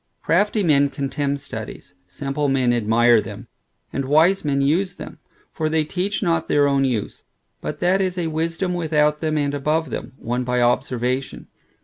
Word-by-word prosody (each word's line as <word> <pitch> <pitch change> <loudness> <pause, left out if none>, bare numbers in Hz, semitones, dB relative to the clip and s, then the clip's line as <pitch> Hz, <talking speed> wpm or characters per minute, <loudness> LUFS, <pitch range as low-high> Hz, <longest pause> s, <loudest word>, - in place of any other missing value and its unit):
Crafty 205 +4 +2
men 145 -4 +4
contemn 140 0 -2
studies, 110 -8 -8
simple 140 +9 -2
men 130 -3 +2
admire 115 0 +4
them, - - -9 0.5
and 135 - -2
wise 160 +8 +3
men 140 -2 0
use 175 +7 +1
them; - - -10 0.3
for 155 -1 -1
they 160 0 +1
teach 195 +6 -2
not 165 -3 0
their 145 -1 +3
own 140 -1 +2
use; 120 -6 -2 0.4
but - - -5
that 185 +2 +3
is 185 -1 -1
a 175 - -1
wisdom 165 +3 -2
without 150 -3 +1
them, 155 -1 0
and 145 -1 0
above 150 +3 -1
them, 125 +3 -5
won 120 +2 -2
by 125 0 0
observation. 125 +1 -1
145 Hz, 165 wpm, -22 LUFS, 130-165 Hz, 0.5 s, men